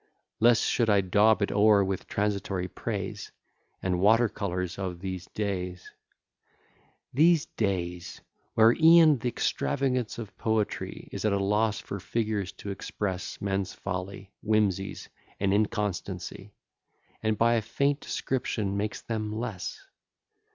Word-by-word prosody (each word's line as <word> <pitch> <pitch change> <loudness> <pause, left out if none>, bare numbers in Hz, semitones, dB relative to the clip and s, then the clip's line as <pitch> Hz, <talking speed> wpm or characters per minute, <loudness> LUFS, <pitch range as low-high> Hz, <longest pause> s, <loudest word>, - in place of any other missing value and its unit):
Less 115 +1 +5
should 115 -2 +1
I 100 -1 +5
daub 105 +3 +4
it - - -1
o'er 105 0 +5
with 95 -1 -3
transitory 100 -3 -1
praise, - - -5 0.5
And 90 -1 0
water 110 +5 +5
colours 90 -3 -3
of 90 -3 -4
these 95 -1 -5
days: 90 -3 -4 1.2
These 160 +3 +4
days! 90 -4 -3 0.4
where 115 +1 +6
e'en 160 -3 +7
th'extravagance 125 - -1
of 110 -4 -7
poetry 110 -2 -2
Is - - -5
at 110 -2 +2
a - - +2
loss 105 +2 +1
for 100 - -6
figures 105 -1 -2
to 100 +1 -7
express 95 -1 -4
Men's 95 -1 -2
folly, 100 +1 -5
whimseys, 100 -3 0 0.3
and 100 0 +2
inconstancy, 105 -2 -2 0.7
And 110 -1 0
by 115 +2 +4
a 115 - +2
faint 140 +6 0
description 110 -9 -2
makes 105 +1 -2
them 110 -2 -3
less. 110 -3 -5
105 Hz, 125 wpm, -28 LUFS, 95-110 Hz, 1.2 s, e'en